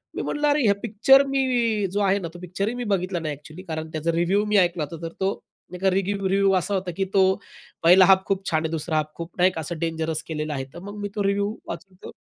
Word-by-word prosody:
मी -, -, -2 dB
म्हंटलं, 295 Hz, 0 st, -1 dB
अरे, 290 Hz, 0 st, +3 dB
हे 200 Hz, -, +5 dB
पिक्चर 235 Hz, +5 st, +5 dB
मी 245 Hz, -6 st, +1 dB
जो 205 Hz, -, -1 dB
आहे 200 Hz, 0 st, +2 dB
ना, 170 Hz, -, -5 dB
तो 175 Hz, -, -10 dB
पिक्चर 185 Hz, +3 st, -3 dB
ही 225 Hz, -, -1 dB
मी 245 Hz, -, -4 dB
बघितला 185 Hz, -1 st, -1 dB
नाही 155 Hz, -2 st, -3 dB
अ‍ॅक्चुअली 155 Hz, +5 st, -12 dB
कारण 160 Hz, -3 st, -5 dB
त्याचा 160 Hz, +1 st, -1 dB
रिव्ह्यू 175 Hz, +5 st, +1 dB
मी 210 Hz, 0 st, +2 dB
ऐकला 175 Hz, -4 st, +2 dB
होता, 165 Hz, -1 st, -8 dB
तर 165 Hz, -, -9 dB
तो 195 Hz, +1 st, -1 dB, 0.4 s
एका 190 Hz, +2 st, +1 dB
रिगिव्ह 195 Hz, +1 st, 0 dB
रिव्ह्यू 195 Hz, 0 st, +3 dB
असा 195 Hz, +3 st, -2 dB
होता, 185 Hz, -2 st, -1 dB
की 195 Hz, -, +1 dB
तो 195 Hz, -, +5 dB, 0.6 s
पहिला 180 Hz, +3 st, +8 dB
हाल्फ 190 Hz, 0 st, +5 dB
खूप 195 Hz, 0 st, -2 dB
छान 155 Hz, 0 st, +1 dB
आहे. 160 Hz, -, -2 dB
दुसरा 160 Hz, 0 st, -2 dB
हाल्फ 155 Hz, 0 st, 0 dB
खूप 170 Hz, +1 st, -7 dB
नाही 185 Hz, +1 st, +4 dB
का 160 Hz, -, -5 dB
असं 160 Hz, +1 st, -5 dB
डेंजरस 160 Hz, -1 st, -2 dB
केलेला 155 Hz, -1 st, -3 dB
आहे. 135 Hz, -2 st, -3 dB
तर 170 Hz, -, -9 dB
मग 205 Hz, +3 st, -9 dB
मी 205 Hz, -, -3 dB
तो 205 Hz, -, 0 dB
रिव्ह्यू 200 Hz, +2 st, 0 dB
वाचवतो. 185 Hz, +2 st, -9 dB
190 Hz, 250 wpm, -24 LUFS, 165-200 Hz, 0.6 s, पहिला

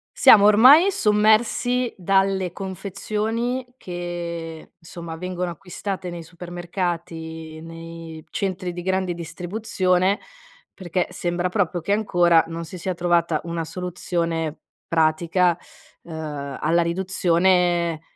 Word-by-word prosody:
Siamo 205 Hz, -1 st, +8 dB
ormai 260 Hz, -, +7 dB
sommersi 220 Hz, -, +2 dB
dalle 190 Hz, 0 st, +1 dB
confezioni, 210 Hz, +6 st, -3 dB
che 170 Hz, -3 st, -6 dB
insomma 165 Hz, 0 st, -8 dB
vengono 180 Hz, +1 st, -3 dB
acquistate 185 Hz, +2 st, -5 dB
nei 175 Hz, -1 st, -6 dB
supermercati 170 Hz, -2 st, -5 dB
nei 165 Hz, -1 st, -9 dB
centri 185 Hz, -2 st, -3 dB
di 175 Hz, -, -6 dB
grande 190 Hz, 0 st, 0 dB
distribuzione, 185 Hz, +2 st, 0 dB, 0.5 s
perché 180 Hz, -1 st, -2 dB
sembra 175 Hz, +1 st, -1 dB
proprio 180 Hz, -2 st, 0 dB
che 180 Hz, +5 st, -1 dB
ancora 175 Hz, -6 st, +4 dB
non 165 Hz, 0 st, -5 dB
si 175 Hz, +3 st, -9 dB
sia 185 Hz, +2 st, -2 dB
trovata 170 Hz, -2 st, +1 dB
una 170 Hz, -1 st, -3 dB
soluzione 165 Hz, -2 st, -3 dB, 0.3 s
pratica, 165 Hz, +2 st, +2 dB, 0.5 s
ehm, 150 Hz, -4 st, -6 dB
alla 170 Hz, +1 st, +3 dB
riduzione 175 Hz, -1 st, +2 dB
175 Hz, 100 wpm, -23 LUFS, 165-190 Hz, 0.5 s, Siamo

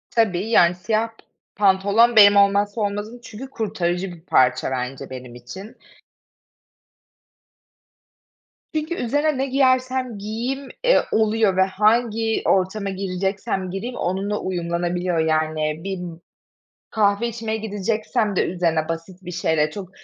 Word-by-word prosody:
Tabii, 210 Hz, -2 st, +1 dB
yani, 175 Hz, -6 st, +5 dB
siyah 215 Hz, +5 st, 0 dB
p 225 Hz, -, -26 dB, 0.4 s
pantolon 205 Hz, +4 st, +3 dB
benim 205 Hz, -1 st, +8 dB
olmazsa 200 Hz, +2 st, +3 dB
olmazım 205 Hz, +3 st, -3 dB
çünkü 240 Hz, +4 st, -9 dB
kurtarıcı 190 Hz, -5 st, -2 dB
bir 165 Hz, -, -14 dB
parça 130 Hz, -5 st, +2 dB
bence 125 Hz, +1 st, -4 dB
benim 125 Hz, -2 st, -9 dB
için. 190 Hz, -, -10 dB, 3.0 s
Çünkü 310 Hz, +2 st, -2 dB
üzerine 290 Hz, +3 st, 0 dB
ne 270 Hz, -, 0 dB
giyersem 255 Hz, -3 st, +1 dB
giyeyim, 240 Hz, +7 st, -4 dB
eee, -, -, +5 dB
oluyor 220 Hz, -3 st, +2 dB
ve 190 Hz, -, +5 dB
hangi 220 Hz, +3 st, +1 dB
ortama 195 Hz, +2 st, +1 dB
gireceksem 190 Hz, 0 st, -3 dB
gireyim 235 Hz, +6 st, -5 dB
onunla 195 Hz, +3 st, -2 dB
uyumlanabiliyor. 175 Hz, -1 st, -2 dB
Yani, 155 Hz, -1 st, 0 dB
bir 195 Hz, -2 st, -4 dB, 0.9 s
kahve 210 Hz, +1 st, +2 dB
içmeye 225 Hz, -1 st, -3 dB
gideceksem 215 Hz, 0 st, -2 dB
de -, -, +2 dB
üzerine 165 Hz, -3 st, -1 dB
basit 175 Hz, +3 st, -6 dB
bir 180 Hz, -, -6 dB
şeyle 155 Hz, -2 st, +1 dB
çok, 195 Hz, -3 st, -8 dB
200 Hz, 120 wpm, -22 LUFS, 180-225 Hz, 3.0 s, benim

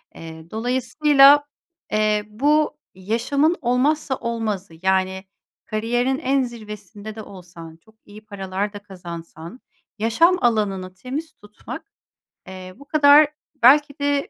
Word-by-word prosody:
eee, 160 Hz, 0 st, -11 dB
dolayısıyla, 275 Hz, +5 st, +4 dB, 0.5 s
eee, 215 Hz, -1 st, +1 dB
bu 295 Hz, +7 st, +1 dB, 0.2 s
yaşamın 235 Hz, -, 0 dB
olmazsa 270 Hz, +3 st, +1 dB
olmazı, 215 Hz, -7 st, -4 dB
yani, 190 Hz, 0 st, 0 dB, 0.4 s
kariyerin 240 Hz, +5 st, -1 dB
en 270 Hz, +1 st, +1 dB
zirvesinde 210 Hz, -3 st, -9 dB
de 220 Hz, -, -7 dB
olsan, 175 Hz, -5 st, -12 dB
çok 220 Hz, +6 st, -26 dB
iyi 215 Hz, +1 st, -14 dB
paralar 200 Hz, 0 st, -4 dB
da 205 Hz, -, -7 dB
kazansan, 175 Hz, 0 st, -10 dB, 0.4 s
yaşam 330 Hz, -, +3 dB
alanını 200 Hz, -6 st, 0 dB
temiz 285 Hz, -, -6 dB
tutmak, 210 Hz, -7 st, -11 dB, 0.6 s
eee, 185 Hz, -1 st, -9 dB
bu 280 Hz, -, -15 dB
kadar 295 Hz, 0 st, +6 dB, 0.4 s
belki 285 Hz, +3 st, +5 dB
de 285 Hz, 0 st, 0 dB
220 Hz, 115 wpm, -21 LUFS, 190-275 Hz, 0.6 s, kadar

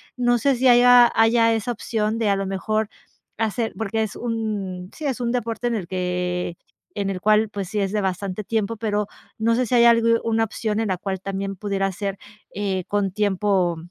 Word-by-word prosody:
no 245 Hz, -1 st, +2 dB
sé 275 Hz, +2 st, +2 dB
si 255 Hz, +2 st, +2 dB
haya 245 Hz, 0 st, +7 dB
haya 230 Hz, 0 st, +4 dB
esa 225 Hz, +2 st, -1 dB
opción 220 Hz, -1 st, -2 dB
de 220 Hz, -3 st, +1 dB
a 200 Hz, -, +3 dB
lo 195 Hz, -, -2 dB
mejor 215 Hz, +3 st, -1 dB, 0.5 s
hacer 225 Hz, +1 st, -1 dB
porque 220 Hz, 0 st, -1 dB
es 215 Hz, -, -5 dB
un 210 Hz, -6 st, -4 dB
sí, 310 Hz, -, -7 dB
es 265 Hz, -3 st, -1 dB
un 235 Hz, -1 st, -1 dB
deporte 240 Hz, 0 st, -2 dB
en 235 Hz, -, 0 dB
el 185 Hz, -6 st, -4 dB
que 180 Hz, -1 st, -2 dB, 0.4 s
en 200 Hz, -1 st, -1 dB
el 190 Hz, -2 st, -3 dB
cual 215 Hz, +2 st, +3 dB
pues 200 Hz, -3 st, -5 dB
sí 210 Hz, -1 st, -2 dB
es 195 Hz, -, -1 dB
de 210 Hz, 0 st, 0 dB
bastante 190 Hz, +1 st, -3 dB
tiempo, 225 Hz, 0 st, -1 dB
pero 210 Hz, -2 st, -1 dB, 0.3 s
no 230 Hz, +1 st, +2 dB
sé 255 Hz, -, +1 dB
si 245 Hz, -, 0 dB
haya 235 Hz, 0 st, +7 dB
algu 230 Hz, 0 st, +4 dB
una 225 Hz, 0 st, +1 dB
opción 215 Hz, 0 st, -3 dB
en 225 Hz, -, 0 dB
la 185 Hz, -, 0 dB
cual 190 Hz, +1 st, -4 dB
también 195 Hz, 0 st, -4 dB
pudiera 195 Hz, -1 st, -1 dB
ser, 195 Hz, +1 st, -4 dB, 0.4 s
eh, 190 Hz, -2 st, -2 dB
con 200 Hz, -2 st, 0 dB
tiempo 195 Hz, -3 st, +1 dB
210 Hz, 205 wpm, -23 LUFS, 195-230 Hz, 0.5 s, haya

